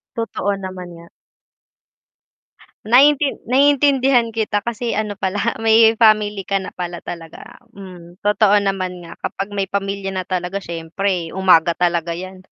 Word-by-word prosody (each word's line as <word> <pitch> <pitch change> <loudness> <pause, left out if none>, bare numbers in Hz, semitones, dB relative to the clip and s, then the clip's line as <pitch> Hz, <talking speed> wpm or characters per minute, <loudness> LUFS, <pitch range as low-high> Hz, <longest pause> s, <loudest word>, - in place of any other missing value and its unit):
Totoo 225 -3 -2
naman 185 -2 -7
nga. 170 0 -14 1.8
Naintin 275 +4 +4
naiintindihan 270 -2 +3
kita 215 -2 -1
kasi, 235 +2 -3
ano, 210 -2 -3
pala 205 +5 -2
may 225 0 +4
family 210 -3 +3
ka 195 -1 -1
na 190 - -7
pala 175 -1 -6
talaga. 165 -1 -10 0.2
Mhm, 180 -2 -13
totoo 210 0 +3
naman 185 -2 -3
nga 170 - -12
kapag 195 +1 -5
may 200 -1 -2
pamilya 195 -1 -3
na 185 - -2
talaga 185 +1 -3
siyempre 170 +1 -3
umaga 175 -3 +4
talaga 170 -1 -1
yan. 185 +2 -9
195 Hz, 135 wpm, -19 LUFS, 180-220 Hz, 1.8 s, Naintin